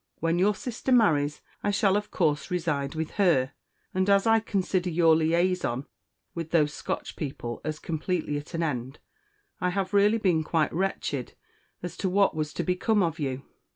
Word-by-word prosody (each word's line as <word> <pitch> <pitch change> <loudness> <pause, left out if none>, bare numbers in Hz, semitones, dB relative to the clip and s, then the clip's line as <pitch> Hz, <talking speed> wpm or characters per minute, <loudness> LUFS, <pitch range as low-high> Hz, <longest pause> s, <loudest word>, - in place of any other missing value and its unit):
When 165 +2 +1
your 205 +3 +3
sister 250 +2 -4
marries, 150 - +3 0.2
I 205 - 0
shall, 200 -1 +3
of 210 0 -1
course, 150 -4 0
reside 160 -5 -1
with 160 0 -3
her; 135 -9 +3 0.4
and 185 +1 +1
as 200 +1 +4
I 225 0 +5
consider 190 -4 -1
your 165 -1 +4
_liaison 165 -5 +1 0.5
_with 165 -1 -4
those 150 -3 +2
Scotch - - -4
people 120 -5 -5
as 155 0 -3
completely 160 -1 -2
at 150 +4 -9
an 165 - 0
end, 130 -3 -3 0.6
I 180 - +1
have 190 +1 -2
really 205 +2 +4
been 180 -7 +2
quite 155 0 0
wretched 165 -8 -2 0.5
as 175 -1 -5
to 190 - -1
what 195 -1 +3
was 155 -1 -2
to 175 - -2
become 190 +4 +1
of 165 -2 -2
you. 135 -2 -3
170 Hz, 175 wpm, -27 LUFS, 150-195 Hz, 0.6 s, I